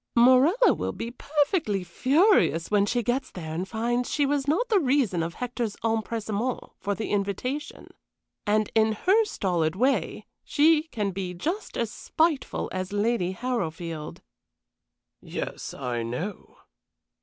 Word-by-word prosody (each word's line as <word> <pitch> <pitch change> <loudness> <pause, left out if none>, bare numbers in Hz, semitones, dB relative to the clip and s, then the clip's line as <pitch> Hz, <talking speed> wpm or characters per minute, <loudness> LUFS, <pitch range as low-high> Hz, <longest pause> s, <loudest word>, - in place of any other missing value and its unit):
"Morella 260 - +6
will - - -3
be 235 - -5
perfectly 285 - 0
furious 260 - +3
when 205 -1 +3
she 240 +2 0
gets 250 +4 -1
there 160 -3 -7
and 180 +4 -3
finds 240 +2 -1
she 290 - +2
was 280 0 0
not 340 +12 +2
the 430 -4 +4
reason 255 - +2
of 165 0 -3
Hector's 240 -3 -3
empressement 225 +1 -1 0.2
for 200 -1 -2
the 220 - -4
invitation. 205 +8 -2 0.6
And 215 0 +2
in 220 0 +3
her 390 - +3
stolid 175 - -1
way 260 +7 0 0.2
she 315 +1 +3
can 210 -9 -2
be 185 -1 -4
just 345 - -3
as 230 -2 -1
spiteful 315 +2 0
as 185 0 -3
Lady 205 -3 0
Harrowfield." 170 -9 -4 1.0
"Yes, - - -5
I 125 -3 -3
know." 125 - -5
225 Hz, 135 wpm, -26 LUFS, 190-275 Hz, 1.0 s, Morella